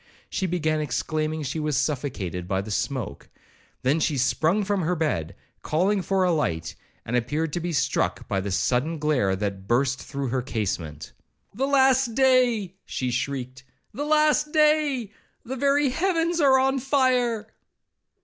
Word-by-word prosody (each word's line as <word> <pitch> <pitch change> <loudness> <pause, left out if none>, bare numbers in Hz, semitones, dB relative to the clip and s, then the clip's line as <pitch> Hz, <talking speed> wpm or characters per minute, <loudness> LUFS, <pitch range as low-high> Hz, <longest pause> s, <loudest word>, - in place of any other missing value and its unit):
She 190 - -1
began 155 -3 0
exclaiming 155 +2 -2
she 150 +4 -3
was 150 -3 0
suffocated 125 - -2
by 95 0 0
the 105 +2 -7
smoke; 110 - -3 0.5
then 140 +5 +2
she 150 -2 0
sprung 160 - +2
from 200 -1 0
her 180 +2 0
bed, 150 - -2 0.3
calling 190 +6 +1
for 190 +2 +1
a 180 - +3
light, 85 - -1 0.3
and 120 - -2
appeared 145 +6 -1
to - - -1
be 175 +1 -3
struck 130 -6 0
by 95 - -1
the 100 - -4
sudden 125 - 0
glare 140 -11 +1
that 100 -1 -4
burst 130 +2 +1
through 140 -2 -4
her 130 +1 0
casement.—'The 100 - -5
last 265 -3 +3
day,' 250 -7 +3
she 125 -1 -3
shrieked, 130 0 -3 0.3
'The 290 - -3
last 300 0 +3
day! 300 -7 +2 0.3
The 255 +3 -4
very 280 +1 +2
heavens 335 +2 0
are 270 -2 +6
on 265 +1 +2
fire!' 250 -4 +1
160 Hz, 150 wpm, -25 LUFS, -, 0.5 s, are